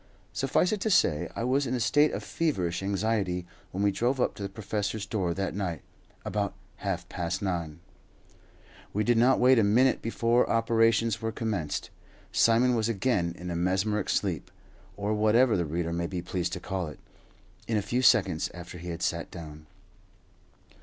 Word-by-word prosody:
Suffice 135 +6 +1
it 210 -2 -2
to 220 - 0
say 80 - +3
I - - -2
was 130 +3 +1
in 125 - -1
a - - -1
state 145 +6 +3
of - - -4
feverish 90 - -1
anxiety 100 -2 -1 0.2
when 95 +2 -3
we 100 - +4
drove 120 +7 0
up - - +1
to - - -11
the 100 - -3
professor's 105 +1 -3
door 95 -6 -1
that 95 0 -2
night, 90 -6 -3 0.4
about - - -2 0.2
half - - -3
past 90 +3 -3
nine. 85 -4 -3 1.1
We 105 - +1
did 120 0 +3
not 130 +3 +4
wait 130 0 +6
a - - +4
minute 120 +6 +3
before 115 +1 +1
operations 115 -1 +2
were 115 0 -1
commenced. 105 -9 -3 0.4
Simon 120 +2 +4
was 115 -1 +1
again 100 -6 0
in 90 0 -6
a - - -2
mesmeric 95 +4 0
sleep, - - -1 0.5
or 100 +1 -1
whatever 110 +3 +4
the 85 -3 0
reader 85 +2 -2
may 85 0 -1
be 90 -1 -4
pleased 90 0 -2
to 90 - -3
call 95 -1 -3
it, 75 - -9 0.7
in 115 - +1
a 105 - 0
few 125 +5 0
seconds 95 -10 +3
after 90 0 -9
he 90 +1 -7
had 85 - -4
sat - - -1
down. 75 -2 -10
100 Hz, 180 wpm, -28 LUFS, 90-115 Hz, 1.1 s, wait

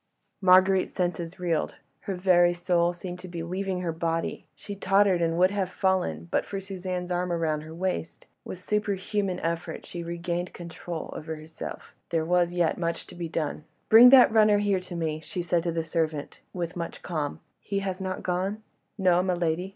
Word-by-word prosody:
Marguerite's 185 0 +5
senses 175 -1 -2
reeled, 170 -3 -1 0.2
her 195 - -4
very 175 -1 +4
soul 175 0 +2
seemed 175 0 -7
to 185 - -9
be 170 -2 -5
leaving 185 +1 -2
her 170 -2 -1
body; 165 0 -2
she 205 - -8
tottered, 195 -2 +3
and 165 0 +1
would 185 +2 +4
have 195 -3 -1
fallen 180 - 0
but - - +2
for 195 - -5
Suzanne's 185 -2 -5
arm 180 0 0
round 160 -3 0
her 160 +1 -10
waist. 180 -2 -3 0.2
With 185 0 -8
superhuman 200 -2 -1
effort 165 0 -3
she 175 - -6
regained 170 +1 -3
control 170 -1 -7
over 160 +1 -5
herself—there 160 +1 -6
was 175 0 +2
yet 175 -1 +1
much 170 -1 -2
to - - -13
be 170 -2 -5
done. 155 -1 -3 0.3
"Bring 235 +3 +10
that 255 -3 +8
runner 215 -2 +5
here 205 -2 +1
to 180 -1 -8
me," 160 -2 -2
she 175 +3 -5
said 170 0 +1
to 170 0 -1
the 165 0 -1
servant, 160 -2 -2
with 175 -1 -4
much 170 -1 -5
calm. 155 -4 -3 0.2
"He 200 - -3
has 190 -1 -3
not 185 -1 -4
gone?" 190 +4 -2 0.3
"No, 180 -3 +4
my 185 -1 0
lady." 175 +2 -1
180 Hz, 180 wpm, -27 LUFS, 170-190 Hz, 0.3 s, Bring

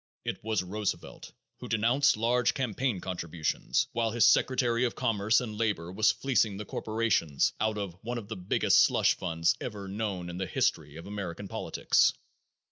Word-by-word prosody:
It - - -4
was 110 -4 0
Roosevelt 105 +2 -4 0.3
who - - -7
denounced 120 +5 +3
large 120 +2 +2
campaign 125 -4 -1
contributions, 85 -3 -1
while 115 -1 0
his 115 -1 +3
secretary 120 0 +3
of 120 - -2
commerce 110 -3 +2
and 110 -4 -5
labor 100 -7 -1
was 105 +3 +3
fleecing 115 -7 0
the 105 - -6
corporations 110 -10 0
out 110 0 0
of 100 -4 -4
one 120 +2 -4
of 110 -4 -7
the 110 - -5
biggest 90 -1 +3
slush - - +3
funds 80 -1 0
ever 105 -4 -6
known 100 -3 -3
in 90 - -7
the 95 - -2
history 75 -2 -1
of 80 - -9
American 100 -1 -6
politics." - - +2
105 Hz, 165 wpm, -29 LUFS, 95-115 Hz, 0.3 s, denounced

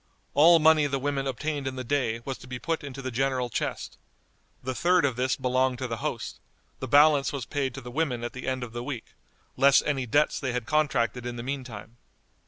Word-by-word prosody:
All 165 +4 +7
money 155 -1 +5
the 140 -1 -1
women 135 0 -2
obtained 145 +2 -3
in 130 - -3
the 130 - -4
day 115 -3 -1
was 135 -1 -4
to - - -13
be 125 0 -5
put 165 +5 -3
into 135 -1 -7
the 130 - -3
general 130 0 0
chest; - - -4 0.6
the 130 +1 -2
third 175 +3 +3
of 130 -4 0
this 130 +1 0
belonged 130 0 +1
to 130 0 -3
the 115 -1 -4
host; - - -4 0.4
the 130 - -4
balance 145 +1 +5
was 140 -5 -4
paid 135 -3 -2
to 135 - -7
the 125 0 -9
women 130 -4 -1
at 120 - -4
the 130 - -7
end 130 -1 -1
of 115 -2 -8
the 120 0 -4
week, 125 -3 -6 0.4
less 140 +1 +6
any 135 -4 -1
debts 145 +7 +2
they 130 -3 -2
had 125 -2 -2
contracted 125 -5 +1
in 120 - -4
the 120 - -6
mean 135 +1 -3
time. 115 -1 -10
130 Hz, 225 wpm, -27 LUFS, 125-145 Hz, 0.6 s, All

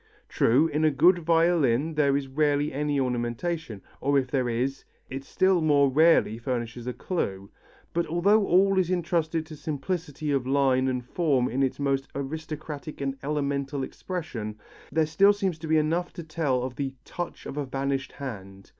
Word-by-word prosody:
True, 130 +7 +3
in 150 0 -1
a 155 - +5
good 170 +5 +4
violin 165 -4 +2
there 140 -2 +3
is 140 -1 -4
rarely 145 +1 +1
any 145 0 0
ornamentation, 125 - -2 0.2
or 140 +1 +2
if 130 -2 0
there 130 -3 +1
is, 130 +4 -2 0.3
it 135 +1 -5
still 185 +4 +2
more 145 -3 +4
rarely 155 -6 +4
furnishes 120 -1 -4
a 125 - -2
clue; 100 - -3 0.4
but 170 0 0
although 200 +6 +3
all 190 +2 +4
is 180 -2 +1
entrusted 165 -2 0
to 155 -1 -10
simplicity 150 0 -3
of 135 -3 0
line 135 -1 +3
and 125 -2 -2
form 135 -4 +1
in 130 +3 -1
its 135 -2 0
most 135 -1 0
aristocratic 155 +1 -6
and 135 -1 -2
elemental 140 -1 -2
expression, 130 - -5 0.3
there 160 0 +2
still 195 +7 +5
seems 190 -5 -2
to 160 - -6
be 160 0 +3
enough 165 +3 0
to 170 - -7
tell 150 -6 -1
of 125 -1 -5
the 135 -2 -3
"touch 175 -1 -6
of - - -6
a 145 - -1
vanished 135 -1 -2
hand." 100 -8 -8
145 Hz, 170 wpm, -27 LUFS, 130-165 Hz, 0.4 s, a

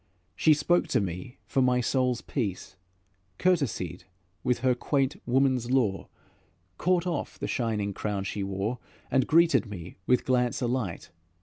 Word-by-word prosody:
She 155 -1 +5
spoke 175 +4 +2
to - - +2
me 95 +5 -5
for 135 - +1
my 125 -1 +3
soul's 125 0 +1
peace, 105 -9 -4 0.6
Courtesied 95 - 0 0.4
with 125 - +1
her 130 -1 +3
quaint 140 - -1
woman's 130 -1 +2
lore, 115 -7 +1 0.7
Caught 180 -1 +2
off 170 -5 -3
the - - -4
shining 105 -4 -1
crown 100 0 -2
she 100 +1 -4
wore, 100 +5 -2 0.3
And 130 -2 +3
greeted 165 -6 +4
me 90 -4 -8
with 125 -1 +3
glance 125 -1 +1
alight. 120 -11 -2
125 Hz, 140 wpm, -28 LUFS, 100-135 Hz, 0.7 s, She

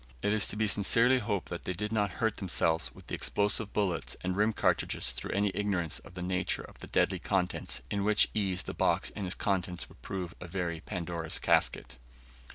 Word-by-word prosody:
It 105 - +2
is 110 -1 +3
to - - -4
be 110 0 +1
sincerely 115 +6 +5
hoped 105 -4 -2
that 85 - -5
they 90 - -1
did 105 +4 -3
not 105 -4 +1
hurt 110 -3 +1
themselves 85 -4 +1
with - - -13
the - - -7
explosive 105 +1 +1
bullets 95 -6 -1
and 90 0 -1
rim 105 +3 +3
cartridges 65 - +1
through - - -5
any 100 0 +1
ignorance 95 -6 -1
of - - -15
the 90 - -4
nature 90 0 -1
of - - -13
the - - -8
deadly 95 -1 +2
contents; 90 -8 -1
in 100 -1 0
which 105 0 +4
ease 95 -3 0
the - - -5
box - - +1
and 100 -3 -3
its 90 - -2
contents 90 -3 -1
would - - -18
prove 90 -3 -4
a 90 - -6
very 85 -2 -2
Pandora's 85 -3 -3
casket. 65 - +1
95 Hz, 205 wpm, -31 LUFS, 90-105 Hz, -, sincerely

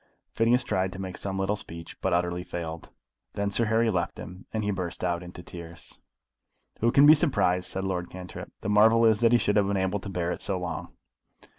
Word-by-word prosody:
Phineas 120 +3 +3
tried 95 -5 0
to 95 - -8
make 95 -1 -5
some 95 -1 -4
little 95 +2 0
speech, 85 -5 -9
but 95 - 0
utterly 90 0 0
failed. 85 -2 -6 0.4
Then 100 0 -1
Sir 115 +3 +2
Harry 110 +1 +2
left 90 -3 -1
them, 90 +2 -10
and 110 -1 -2
he 105 - 0
burst 90 -3 -4
out 85 -1 0
into 90 0 -10
tears. 85 -1 -11 0.8
"Who 115 +1 +3
can 140 +3 +6
be 150 - +10
surprised?" 100 - +1
said 95 - -3
Lord 90 -2 -2
Cantrip. 90 -1 -9
"The - - -3
marvel 110 +2 +5
is 110 -2 +4
that 115 -1 +4
he 120 - +6
should 105 -3 +1
have 100 -1 +3
been 100 0 0
able 95 +2 0
to 100 - -7
bear 90 -2 -2
it - - -5
so 100 -3 -1
long." 85 -2 -5
95 Hz, 220 wpm, -27 LUFS, 90-105 Hz, 0.8 s, be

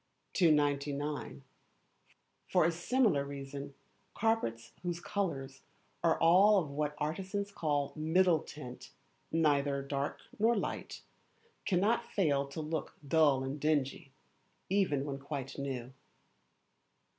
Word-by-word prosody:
299. 145 -3 +1 1.0
For - - +3
a 170 - +3
Similar 175 - +2
Reason, 140 0 -7 0.4
carpets 210 - 0
whose 175 -1 -3
colours 140 -9 -3 0.4
are 165 -1 +3
all 190 +5 +6
of 160 -7 0
what 150 +1 -2
artists 190 +7 -3
call 145 -6 -1
middle 160 +2 +3
tint 125 -5 -10 0.4
(neither 145 -3 +2
dark 140 0 -3 0.2
nor 230 +2 +4
light), - - -4 0.6
cannot 210 +5 +2
fail 145 -8 +2
to 140 +3 -5
look 155 0 -4
dull 145 -3 +4
and 135 +3 -4
dingy, 145 -2 0 0.6
even 165 -9 +2
when 140 -1 -4
quite 140 -1 -5
new. 130 -2 -4
150 Hz, 110 wpm, -33 LUFS, 140-175 Hz, 1.0 s, all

